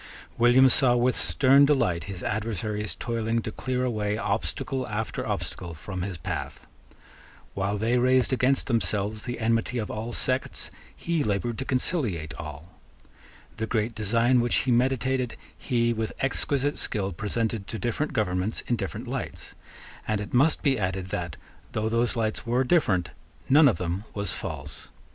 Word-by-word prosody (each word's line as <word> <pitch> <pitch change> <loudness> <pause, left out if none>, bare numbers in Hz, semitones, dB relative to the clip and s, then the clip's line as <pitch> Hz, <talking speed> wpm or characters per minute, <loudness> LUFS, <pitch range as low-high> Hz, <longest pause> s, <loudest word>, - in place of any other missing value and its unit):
William 120 +3 +6
saw 125 -1 +5
with 125 +1 +2
stern 135 +1 +5
delight 90 - +2
his 95 -3 -7
adversaries 105 -1 -2
toiling 115 -1 -1
to 110 - -4
clear 130 +2 -2
away 105 -3 -1
obstacle 115 +5 -2
after 110 0 -3
obstacle 85 -2 -4
from 95 +4 -6
his 95 -1 -3
path. 75 - -5 0.9
While 100 +1 -1
they 115 +4 +2
raised 130 +1 +3
against 130 +1 +3
themselves 105 -2 0
the 120 - -4
enmity 115 +2 +1
of 110 -3 -3
all 110 +2 -4
sects, 130 +2 -1 0.2
he 170 -3 -1
laboured 110 +3 -1
to 135 - -3
conciliate 115 - -1
all. 80 +2 -9 0.8
The 110 0 -2
great 115 0 0
design 115 +4 +3
which 120 - +1
he 130 - +2
meditated, 130 0 +1 0.2
he 120 -1 +1
with 110 -1 -3
exquisite 140 +1 0
skill 100 -2 0
presented 110 +2 -2
to 115 - -4
different 120 +8 -1
governments 105 -4 -1
in 120 - 0
different - - -5
lights; - - -5 0.5
and 110 -1 0
it 105 - -6
must 140 +6 +3
be 135 -4 +2
added 95 -1 -2
that, 85 -6 -4 0.4
though 110 +1 0
those 115 +2 +1
lights 110 -2 -1
were 120 +2 +1
different, 100 - +2 0.4
none 145 +2 +7
of 110 -10 +3
them 90 +4 -3
was 100 -3 -1
false. - - -6
115 Hz, 155 wpm, -26 LUFS, 100-125 Hz, 0.9 s, none